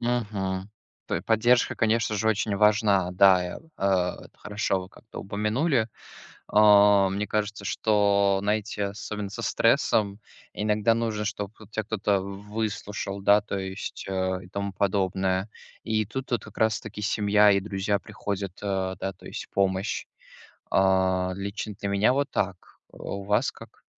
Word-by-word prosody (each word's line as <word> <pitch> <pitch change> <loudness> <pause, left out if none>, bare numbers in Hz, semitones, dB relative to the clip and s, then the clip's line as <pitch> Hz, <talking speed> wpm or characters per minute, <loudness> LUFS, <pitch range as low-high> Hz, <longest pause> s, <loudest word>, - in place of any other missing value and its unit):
Мгм. 105 -5 -2 0.4
Той - - -2
поддержка, 120 +2 +3
конечно 115 -1 +1
же, 110 +2 +1
очень 105 -1 0
важна. 105 -3 +3
Да, 95 0 +6
я, 90 - -5
э, - - -9 0.3
это 90 -2 0
хорошо 105 -2 -1
вы 90 - -10
как-то 110 - -11
упомянули. 110 - 0 0.6
А, 105 -2 +6
мне 100 +2 -2
кажется, 105 -1 -2
что, 100 -1 +2
знаете, 105 0 -1
особенно 105 0 -5
со - - -6
стрессом, 100 -1 +2 0.3
иногда 105 +2 +1
нужно, 110 -2 -1
чтоб 100 -1 -3
тут 110 -1 -15
тя 110 - -2
кто-то 105 -2 0
в 100 +2 -8
выслушал, 100 -2 -3
да, 105 +1 +6
то 100 -1 -4
есть, 95 +1 -6
э, 95 -1 -1
и - - -14
тому 100 0 -4
подобное. 95 0 0 0.3
И 110 -1 0
тут 130 +5 -6
вот 120 -4 -1
как 110 - -12
раз 110 0 +2
таки 110 -1 -8
семья 105 0 +4
и 100 - +2
друзья 100 0 -1
приходят, 100 -1 -5
э, 95 -2 -1
да, 95 - -2
то - - -21
есть - - -6
в - - -52
помощь. 95 0 0 0.7
А, 95 -1 +2
лично 100 +2 -5
для 100 - -3
меня 100 +5 +3
вот 140 0 0
так. 95 -2 -1 0.4
А - - -17
у 100 0 -5
вас 105 +1 +1
как? - - -15
100 Hz, 160 wpm, -26 LUFS, 95-110 Hz, 0.7 s, Да